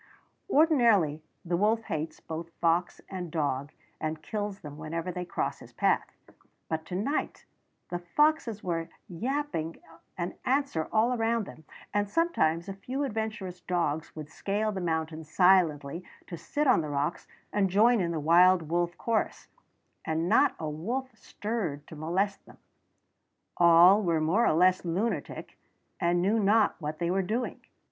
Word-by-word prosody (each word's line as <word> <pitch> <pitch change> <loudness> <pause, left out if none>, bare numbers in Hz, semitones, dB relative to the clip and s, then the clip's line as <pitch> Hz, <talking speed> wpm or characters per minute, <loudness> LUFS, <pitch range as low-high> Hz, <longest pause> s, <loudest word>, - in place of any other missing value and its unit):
Ordinarily 235 - +4 0.2
the 175 0 0
wolf 220 +4 +2
hates 155 -4 -4
both 165 +1 -6
fox 170 +1 +1
and 180 -3 -5
dog, 145 -3 -2 0.3
and 155 0 -4
kills 205 -2 -4
them 150 0 -9
whenever 165 +3 -4
they 180 0 -5
cross 175 - -3
his - - -14
path; - - 0 0.5
but 160 0 -3
to 180 - -5
night 250 +11 -2 0.4
the 175 - -3
foxes 235 - +1
were 165 -2 -2 0.2
yapping 225 - -3 0.4
an 175 0 -3
answer 265 - 0
all 225 +3 +3
around 230 -1 +1
them, 155 -4 -13 0.3
and 205 -1 0
sometimes 200 - +1
a 195 - -4
few 255 +8 -4
adventurous 215 -7 -4
dogs 165 -4 -2
would 155 -2 -7
scale 210 +4 -1
the 190 -2 -4
mountains 160 -2 -3
silently 170 -4 +3 0.2
to 170 - -7
sit 290 - -2
on 255 - +5
the 155 - -5
rocks 145 +3 -2 0.3
and 200 -2 +2
join 220 +4 +4
in 170 - 0
the 165 -2 -2
wild 170 +1 +5
wolf 175 +1 0
chorus, 230 -2 -2 0.5
and 160 +1 -1
not 240 +8 +4
a 160 - -4
wolf 235 - -4
stirred 195 -9 -4
to - - -11
molest 185 +6 -1
them. - - -16 1.0
All 175 +4 +7
were 170 -5 +1
more 170 +10 +2
or - - +3
less 180 +3 +4
lunatic, 185 +7 -3 0.4
and 175 +1 +2
knew 210 +4 +2
not 210 +1 +3
what 155 +1 -4
they 170 +1 -1
were 195 +1 +2
doing. 225 +7 -3
180 Hz, 155 wpm, -29 LUFS, 160-220 Hz, 1.0 s, All